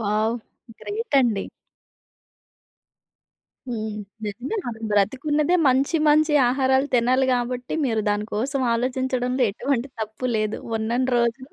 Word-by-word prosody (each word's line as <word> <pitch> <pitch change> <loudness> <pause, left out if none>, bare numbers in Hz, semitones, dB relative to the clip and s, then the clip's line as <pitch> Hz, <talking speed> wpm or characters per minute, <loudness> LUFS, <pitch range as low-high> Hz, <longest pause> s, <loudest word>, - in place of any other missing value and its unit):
Wow! 215 +2 0 0.4
Great 445 +3 -5
అండి. 225 -6 0 2.2
హ్మ్. 220 -2 -3 0.3
నిజంగా 245 - -4
మనం 230 -2 -6
బ్రతికున్నదే 285 - +1
మంచి, 270 +5 +2
మంచి 310 +1 +4 0.2
ఆహారాలు 265 +1 +2
తినాలి 255 +2 +3
గాబట్టి. 250 0 -2
మీరు 225 -4 +1
దాని 205 0 0
కోసం 265 +6 -1
ఆలోచించడంలో 255 +1 -1
ఎటువంటి 265 +4 -2
తప్పు 220 +4 -4
లేదు. 215 0 -1 0.2
ఉన్నని 235 +4 -1
రోజులు 240 +4 -1
250 Hz, 110 wpm, -23 LUFS, 220-265 Hz, 2.2 s, మంచి